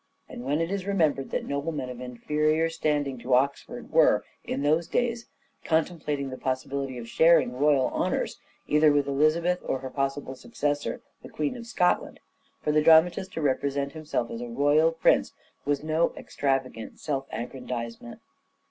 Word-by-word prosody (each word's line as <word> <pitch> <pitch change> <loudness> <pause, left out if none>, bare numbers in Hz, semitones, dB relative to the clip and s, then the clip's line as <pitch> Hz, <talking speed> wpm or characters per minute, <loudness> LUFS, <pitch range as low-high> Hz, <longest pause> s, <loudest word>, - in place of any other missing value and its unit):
And 120 - -8
when 145 +5 0
it 165 +2 -2
is 195 -1 -3
remembered 155 -9 +1
that - - -2
noblemen 140 -1 -3
of 125 0 -9
inferior 150 +6 0
standing 145 -5 -1
to 125 +2 +2
Oxford 140 +2 -1
were, - - +4 0.2
in 140 - -3
those 160 +3 +2
days, 235 +2 -1 0.4
contemplating 150 -4 -1
the 130 - -7
possibility 130 0 -3
of 115 -1 -7
sharing 160 -2 +4
royal 140 -1 +3
honours, - - -1 0.3
either 150 0 +5
with 145 -1 +2
Elizabeth 155 +6 +2
or - - -1
her 130 0 -7
possible 135 0 -2
successor, 145 +2 -3 0.2
the - - -11
Queen 150 +6 -2
of 235 -1 -9
Scotland, 180 -6 0 0.4
for 150 - +1
the 155 0 +3
dramatist 165 +4 +5
to 160 - -3
represent 140 0 0
himself 155 -7 -3
as 115 - -5
a 120 - -5
royal 145 +6 +3
prince 165 - +2 0.3
was 145 0 0
no 160 +2 +1
extravagant 135 -5 -2
self 135 -3 -3
aggrandizement. 120 -1 -6
145 Hz, 155 wpm, -27 LUFS, 135-160 Hz, 0.4 s, either